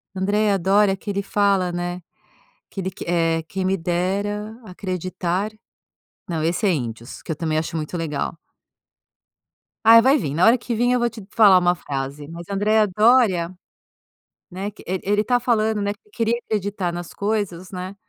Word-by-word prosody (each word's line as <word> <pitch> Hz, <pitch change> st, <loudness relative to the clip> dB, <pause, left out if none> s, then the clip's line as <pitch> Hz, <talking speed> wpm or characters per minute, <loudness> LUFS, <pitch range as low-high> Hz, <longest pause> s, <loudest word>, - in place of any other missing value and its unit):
Andreia 205 Hz, +2 st, +1 dB
Doria, 195 Hz, +2 st, +3 dB
que 205 Hz, -, -8 dB
ele 200 Hz, 0 st, -1 dB
fala, 200 Hz, -3 st, +1 dB
né, 175 Hz, +1 st, -4 dB, 0.7 s
que 195 Hz, -, -5 dB
ele 190 Hz, 0 st, -3 dB
que, 190 Hz, -, -9 dB
eh: 165 Hz, -1 st, +1 dB
"Quem 190 Hz, 0 st, -3 dB
me 190 Hz, +1 st, +1 dB
dera 200 Hz, +5 st, -2 dB
acreditar." 185 Hz, 0 st, -3 dB, 0.8 s
Não, 165 Hz, -3 st, -2 dB
esse 170 Hz, +7 st, 0 dB
é 190 Hz, -, +4 dB
Índios, 120 Hz, -4 st, -5 dB
que -, -, -6 dB
eu 155 Hz, -, -1 dB
também 160 Hz, -2 st, -1 dB
acho 160 Hz, +1 st, -2 dB
muito 155 Hz, +3 st, -4 dB
legal. 160 Hz, 0 st, -3 dB, 1.5 s
Ai, 230 Hz, 0 st, +10 dB
vai 265 Hz, +5 st, +4 dB
vim. 145 Hz, -, -3 dB
Na 170 Hz, +4 st, +3 dB
hora 235 Hz, -, +6 dB
que 240 Hz, 0 st, -4 dB
vim, 245 Hz, +2 st, +2 dB
eu 250 Hz, -, +2 dB
vou 240 Hz, -, +2 dB
te 220 Hz, -3 st, -10 dB
falar 200 Hz, -5 st, +6 dB
uma 175 Hz, 0 st, +2 dB
frase, 140 Hz, -1 st, -5 dB
mas 170 Hz, +4 st, -9 dB
a 200 Hz, -, -2 dB
Andreia 215 Hz, +1 st, +3 dB
Doria, 200 Hz, -4 st, +3 dB, 1.0 s
né, 195 Hz, +3 st, -4 dB
que 210 Hz, -, -16 dB
ele 185 Hz, 0 st, -2 dB
ele 205 Hz, +1 st, +2 dB
está 245 Hz, +2 st, +1 dB
falando, 220 Hz, -3 st, +1 dB
né, 200 Hz, 0 st, -1 dB
que 220 Hz, -, -29 dB
queria 230 Hz, -, 0 dB
acreditar 205 Hz, -5 st, -2 dB
nas 175 Hz, 0 st, -7 dB
coisas, 200 Hz, -4 st, -2 dB
né, 185 Hz, +1 st, -6 dB
190 Hz, 180 wpm, -22 LUFS, 175-210 Hz, 1.5 s, Ai